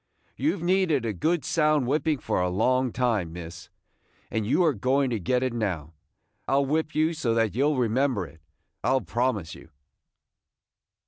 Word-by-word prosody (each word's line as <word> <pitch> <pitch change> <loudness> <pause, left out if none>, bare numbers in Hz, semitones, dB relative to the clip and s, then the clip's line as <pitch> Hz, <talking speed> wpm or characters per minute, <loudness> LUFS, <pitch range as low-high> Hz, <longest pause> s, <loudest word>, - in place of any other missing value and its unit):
"You 310 - 0
've 170 - -8
needed 175 -8 +2
a 110 - -1
good 160 - 0
sound 150 -4 +2
whipping 150 +3 +1
for 105 - -1
a 90 - +1
long 125 +7 +1
time, 115 -9 0
miss, 85 +1 -9 0.6
and 110 -2 -1
you 180 - +3
are 160 -4 +3
going 130 +4 +1
to 115 - -1
get 125 +8 0
it 130 -2 -1
now. 90 -9 -3 0.5
I - - 0
'll 140 0 +3
whip 155 +2 -1
you 155 +2 +2
so 120 -8 -1
that 115 -2 +1
you 135 +6 +2
'll 150 -2 +1
remember 125 -3 +1
it, 80 +1 -16 0.4
I - - +1
'll 135 - +2
promise 115 -9 -1
you." 80 - -13
125 Hz, 185 wpm, -26 LUFS, 105-150 Hz, 0.6 s, you